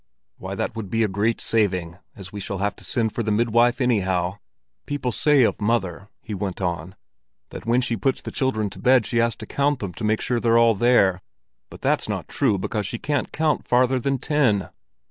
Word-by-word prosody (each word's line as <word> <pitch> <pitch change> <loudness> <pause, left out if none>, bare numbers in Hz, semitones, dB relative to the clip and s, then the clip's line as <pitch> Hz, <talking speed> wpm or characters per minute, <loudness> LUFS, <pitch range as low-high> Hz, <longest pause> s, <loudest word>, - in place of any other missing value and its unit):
"Why, - - -5
that - - -3
would 110 -4 -5
be 115 +4 +1
a - - +2
great 105 +4 0
saving, 90 -6 0 0.2
as 95 -2 -9
we 105 - -5
shall 100 0 -4
have 100 0 -1
to - - -12
send 115 -3 -1
for - - -2
the 110 - -2
midwife 120 +3 +3
anyhow. 95 -7 0 0.5
People 145 -4 -2
say 145 +2 +3
of 110 - 0
mother," 100 -4 -1
he 110 - -6
went 95 -2 -4
on, 90 0 -3 0.5
"that - - -9
when 120 +2 +3
she's 120 -2 -2
put 135 -2 +2
the - - -8
children 110 -7 -1
to - - -10
bed 125 -3 +4
she 120 - -2
has 115 -1 +2
to - - -9
count 140 0 0
them 100 -7 -5
to 110 - -8
make 110 0 +1
sure 120 -1 0
they're 115 0 +3
all 115 -1 +5
there; 100 -4 +3 0.5
but - - -13
that's - - +1
not - - -3
true, 100 - +1
because 100 +2 -2
she 115 - -3
can't 145 +2 -2
count 155 -1 0
farther 125 +1 +3
than 135 +2 0
ten." 130 -8 +1
115 Hz, 215 wpm, -23 LUFS, 100-125 Hz, 0.5 s, all